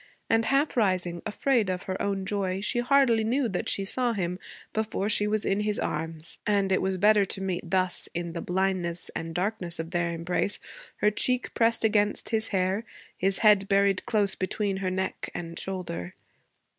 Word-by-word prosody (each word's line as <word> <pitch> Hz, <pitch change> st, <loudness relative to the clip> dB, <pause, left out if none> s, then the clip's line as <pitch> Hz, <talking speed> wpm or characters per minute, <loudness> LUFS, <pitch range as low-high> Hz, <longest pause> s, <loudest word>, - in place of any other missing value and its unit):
And, 225 Hz, 0 st, +3 dB
half 275 Hz, +6 st, +2 dB
rising, 185 Hz, -6 st, +1 dB
afraid 225 Hz, -1 st, +1 dB
of 180 Hz, -1 st, -2 dB
her 185 Hz, 0 st, -4 dB
own 195 Hz, -1 st, -1 dB
joy, 195 Hz, -2 st, -1 dB
she 225 Hz, +3 st, 0 dB
hardly 245 Hz, -3 st, +4 dB
knew 245 Hz, +4 st, +1 dB
that 190 Hz, -5 st, -1 dB
she 195 Hz, -, 0 dB
saw 245 Hz, +3 st, 0 dB
him 180 Hz, -3 st, -2 dB, 0.3 s
before 215 Hz, -2 st, -1 dB
she 210 Hz, -1 st, +3 dB
was 215 Hz, 0 st, +1 dB
in 195 Hz, -, +1 dB
his 210 Hz, 0 st, 0 dB
arms; 160 Hz, 0 st, -3 dB
and 200 Hz, -2 st, +2 dB
it 190 Hz, -, +3 dB
was 190 Hz, 0 st, 0 dB
better 210 Hz, +2 st, +5 dB
to 190 Hz, -, -5 dB
meet 185 Hz, -3 st, -3 dB
thus, 185 Hz, -1 st, 0 dB
in 170 Hz, -1 st, -3 dB
the 170 Hz, -, -4 dB
blindness 180 Hz, -2 st, -1 dB
and 165 Hz, 0 st, -4 dB
darkness 180 Hz, -2 st, -2 dB
of 165 Hz, +1 st, -5 dB
their 175 Hz, -1 st, 0 dB
embrace, 175 Hz, +4 st, -1 dB, 0.4 s
her 210 Hz, -, +4 dB
cheek 250 Hz, +4 st, 0 dB
pressed 230 Hz, 0 st, +2 dB
against 210 Hz, -1 st, +2 dB
his 225 Hz, -1 st, +1 dB
hair, 190 Hz, +2 st, 0 dB, 0.3 s
his 195 Hz, +1 st, +1 dB
head 205 Hz, -2 st, +6 dB
buried 200 Hz, -1 st, +2 dB
close 205 Hz, -3 st, +2 dB
between 195 Hz, +1 st, -2 dB
her 190 Hz, -1 st, -1 dB
neck 190 Hz, +1 st, -3 dB
and 170 Hz, -1 st, -5 dB
shoulder. 135 Hz, -, -5 dB
195 Hz, 180 wpm, -27 LUFS, 180-215 Hz, 0.4 s, head